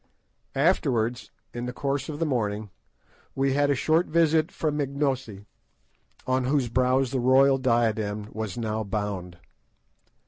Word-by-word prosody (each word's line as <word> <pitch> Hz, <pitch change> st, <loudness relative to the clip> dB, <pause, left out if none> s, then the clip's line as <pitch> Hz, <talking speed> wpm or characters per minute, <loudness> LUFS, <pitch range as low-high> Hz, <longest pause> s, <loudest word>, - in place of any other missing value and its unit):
Afterwards, 130 Hz, -6 st, +1 dB, 0.2 s
in 120 Hz, +1 st, -4 dB
the 125 Hz, -, -4 dB
course 140 Hz, +3 st, -2 dB
of 150 Hz, -, -4 dB
the 165 Hz, -, 0 dB
morning, 105 Hz, -7 st, -2 dB, 0.6 s
we 135 Hz, 0 st, +1 dB
had 145 Hz, +1 st, +2 dB
a 140 Hz, -, +3 dB
short 160 Hz, +6 st, +2 dB
visit 160 Hz, +1 st, +2 dB
from 150 Hz, -2 st, -1 dB
Ignosi, 135 Hz, -7 st, -2 dB, 0.8 s
on 130 Hz, 0 st, +1 dB
whose 135 Hz, -2 st, +1 dB
brows 130 Hz, +1 st, +2 dB
the 135 Hz, -, 0 dB
royal 135 Hz, +2 st, +4 dB
diadem 110 Hz, -4 st, 0 dB
was 110 Hz, -2 st, -4 dB
now 110 Hz, -1 st, -2 dB
bound. 100 Hz, -4 st, -4 dB
130 Hz, 135 wpm, -26 LUFS, 110-140 Hz, 0.8 s, royal